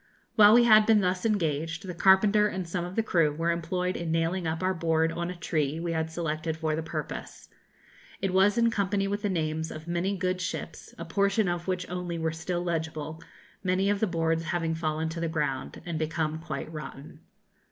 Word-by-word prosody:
While 210 +1 +8
we 240 - +7
had 215 -2 +6
been 220 -2 +5
thus 185 +3 0
engaged, 165 -3 -1
the 180 - -5
carpenter 200 +4 +5
and 185 -3 -4
some 175 +1 -2
of 180 +2 -6
the 225 - +2
crew 165 -8 +2
were 165 +2 +1
employed 180 +2 -1
in 170 -1 -3
nailing 165 +2 0
up 160 +3 -2
our 185 0 +2
board 165 -1 +1
on 170 +1 -3
a 180 - -5
tree 155 -3 -1
we 170 0 -2
had 160 -1 -1
selected 160 -1 -3
for 160 -1 -1
the 160 - -2
purpose. 160 - -6 0.7
It 195 -2 -1
was 195 +3 +4
in 230 0 +4
company 200 -2 0
with 205 +1 -2
the 205 - 0
names 160 -2 -1
of 155 +1 -9
many 175 +3 -1
good 185 +1 -1
ships, - - -5
a - - -6
portion 200 +1 +1
of 175 0 -2
which 180 -1 -2
only 180 -1 -4
were 160 -1 -1
still 175 +2 -3
legible, 160 -2 -3 0.4
many 190 +2 +2
of 205 - 0
the 220 - +2
boards 165 -1 0
having 165 -2 -1
fallen 160 0 -1
to 165 +1 -5
the 165 - -1
ground 150 -5 -2
and 170 -3 -3
become 155 0 -1
quite 160 -1 -6
rotten. 150 -2 -8
170 Hz, 205 wpm, -28 LUFS, 160-190 Hz, 0.7 s, While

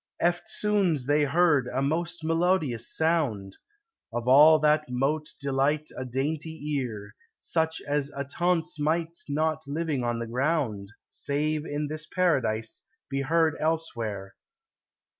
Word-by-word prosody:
Eftsoons 175 - +1
they 145 +2 +3
heard 150 -3 +3
a 125 - -2
most 165 +4 -1
melodious 165 - +1
sound, 140 - 0 0.6
Of 120 +1 -4
all 150 +5 +8
that 150 -1 +2
mote 150 +5 -1
delight 140 +2 0
a 130 - -5
daintie 150 +5 -3 0.2
eare, 105 -5 -6 0.3
Such 160 -1 -1
as 145 -1 -1
attonce 160 +4 -1
might 165 +2 0
not 155 +1 0
on 140 - -4
living 160 -5 -1 0.3
ground, 125 -7 -1 0.2
Save 150 +2 -2
in 145 +1 -2
this 155 +1 -6
paradise, 125 -12 0 0.3
be 135 0 0
heard 160 +2 +2
elsewhere. 115 -12 -2
150 Hz, 120 wpm, -27 LUFS, 135-160 Hz, 0.6 s, all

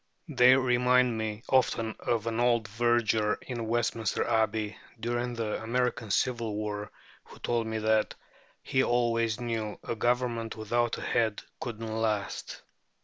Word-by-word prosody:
They 130 -2 +6
remind 125 -1 +3
me 110 0 -3
often 115 -4 +2
of 115 -2 -1
an 115 0 -1
old 120 -2 +2
verger 110 -1 +2
in 120 -3 -4
Westminster 115 -2 0
Abbey 110 -2 0 0.2
during 120 +1 -2
the 115 -2 -2
American 120 -1 -1
civil 115 0 0
war 105 -1 -4 0.3
who - - -14
told 115 -1 -1
me 110 0 -2
that 110 0 +1 0.5
"he 130 - +2
always 115 -2 +1
knew 115 -3 -3
a - - -3
government 120 0 0
without 120 +2 0
a - - -7
head 110 -3 0 0.2
couldn't 115 -2 -5
last." 110 -3 -2
115 Hz, 140 wpm, -29 LUFS, 110-120 Hz, 0.5 s, They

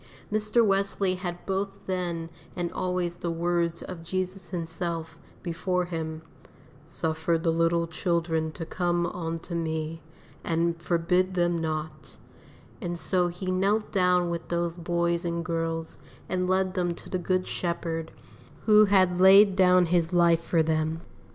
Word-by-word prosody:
Mr. 215 +2 +2
Wesley 195 -1 +1
had 175 -1 -5
both 195 +1 -1 0.2
then 175 -3 -3 0.2
and 175 -1 -2
always 180 -1 -2
the 175 - -3
words 170 0 0
of 180 -3 -7
Jesus 185 +2 -4
Himself, 165 -2 -4 0.2
before 180 +1 -1
him, 160 -2 -5 0.6
"Suffer 160 +1 -1
the 165 0 +1
little 165 +1 +2
children 165 -1 -1
to 165 - -6
come 175 0 0
unto 165 0 -4
Me, 160 -1 -3 0.4
and 165 0 0
forbid 180 +2 +1
them 175 -1 +2
not;" 160 -1 -4 0.6
and 175 -3 -3
so 180 +1 +1
he 180 +2 -4
knelt 200 +4 +1
down 180 -2 +2
with 170 -1 -4
those 170 -1 -1
boys 170 0 0
and 170 -1 -2
girls 165 -1 -3 0.3
and 180 0 -1
led 185 0 +1
them 175 -2 -1
to - - -12
the 185 - -2
Good 185 +1 0
Shepherd, 165 -2 -3 0.5
who 215 -1 +7
had 185 -3 +3
laid 195 +1 +8
down 180 -1 +5
His 170 0 +1
life 170 -2 +4
for 165 -2 +2
them. 160 0 0
175 Hz, 145 wpm, -27 LUFS, 165-185 Hz, 0.6 s, laid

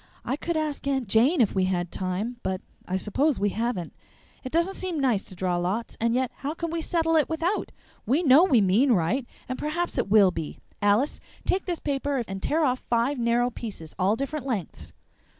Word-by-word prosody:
"I 255 - 0
could 335 +2 -2
ask 305 -3 -2
Aunt 265 -4 0
Jane 245 - +4
if 215 - +3
we 190 -1 +2
had 175 -2 -1
time, 195 +6 -3
but 185 0 -2 0.3
I 185 - 0
suppose 270 +10 +1
we 205 +1 +2
haven't. 220 -5 -2 0.5
It 255 - -6
doesn't 340 +4 +1
seem 365 -5 -3
nice 250 -8 +2
to 185 - -11
draw 180 0 0
lots, 190 +6 -2
and 230 +1 +2
yet 255 -1 0
how 290 +3 -4
can 335 -1 -3
we 335 0 -2
settle 325 0 +1
it 310 - +3
without? 330 +5 -1 0.4
We 285 +10 +2
know 285 +2 +7
we 260 - +4
mean 220 +8 +4
right, 220 +8 0 0.2
and 255 - -4
perhaps 345 +4 -2
it - - -1
will 200 -3 +6
be. 160 -4 -5 0.2
Alice, 205 +8 +2 0.3
take 380 - +1
this 350 -2 -1
paper 280 -2 -1
and 195 0 -5
tear 315 +1 +1
off 255 -1 +1
five 240 +4 0
narrow 240 +1 +2
pieces, 200 -10 -7
all 190 +3 +3
different 275 +2 -4
lengths." 210 - -4
245 Hz, 205 wpm, -26 LUFS, 200-300 Hz, 0.5 s, know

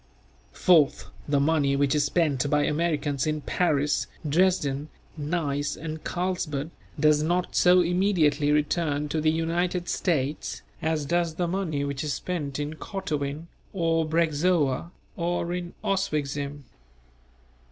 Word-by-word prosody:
Fourth, 155 -5 +3 0.2
the 145 -1 +2
money 140 -1 +2
which 140 -1 +2
is 150 -1 +2
spent 145 -4 +1
by 150 0 +3
Americans 150 -3 0
in 155 0 0
Paris, 145 -3 +1 0.2
Dresden, 150 -3 +1 0.3
Nice 145 -2 -1
and 155 0 -6
Carlsbad, 170 -5 -2 0.3
does 150 -1 +4
not 175 +3 0
so 180 0 +6
immediately 170 -5 +2
return 150 0 +1
to 155 +1 -1
the 155 - +3
United 170 +2 0
States 150 -4 -1 0.2
as 160 -2 0
does 170 +1 0
the 175 +1 0
money 170 -6 -1
which 140 0 -3
is 145 -2 -1
spent 150 -6 -3
in 145 +1 -3
Kottowin 155 -6 -4 0.3
or 165 -3 +1
Breczowa 160 -2 +1 0.3
or 175 0 -1
in 175 -1 -5
Oswicczim. 145 -6 -2
155 Hz, 125 wpm, -26 LUFS, 145-175 Hz, 0.3 s, so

